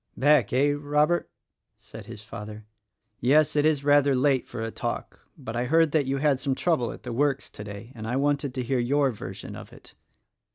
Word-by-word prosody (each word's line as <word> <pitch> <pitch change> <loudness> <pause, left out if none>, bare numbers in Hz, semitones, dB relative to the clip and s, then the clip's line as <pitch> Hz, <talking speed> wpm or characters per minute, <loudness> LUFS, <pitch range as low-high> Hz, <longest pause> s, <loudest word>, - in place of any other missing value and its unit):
"Back, 145 -5 +4
eh! 140 +3 +3
Robert?" 150 +3 +1 0.5
said - - -12
his 105 - -9
father, 105 0 -9 0.5
"Yes, 145 +5 +3
it 150 +1 +4
is 150 -3 +1
rather 145 -1 +4
late 130 0 +2
for 120 - -7
a 115 - -4
talk; - - -5
but 110 - -7
I 120 +1 0
heard 160 +3 +3
that 145 -3 +1
you 135 +1 0
had 140 -2 +2
some 135 -1 -1
trouble 155 -9 0
at - - -11
the 125 - -5
works 140 +2 0
today, 105 +3 -9
and 110 -3 -7
I 120 - -1
wanted 140 -1 0
to 130 - -2
hear 125 +1 0
your 135 +3 +2
version 110 - -8
of - - -10
it." - - -15
135 Hz, 200 wpm, -26 LUFS, 120-145 Hz, 0.5 s, Back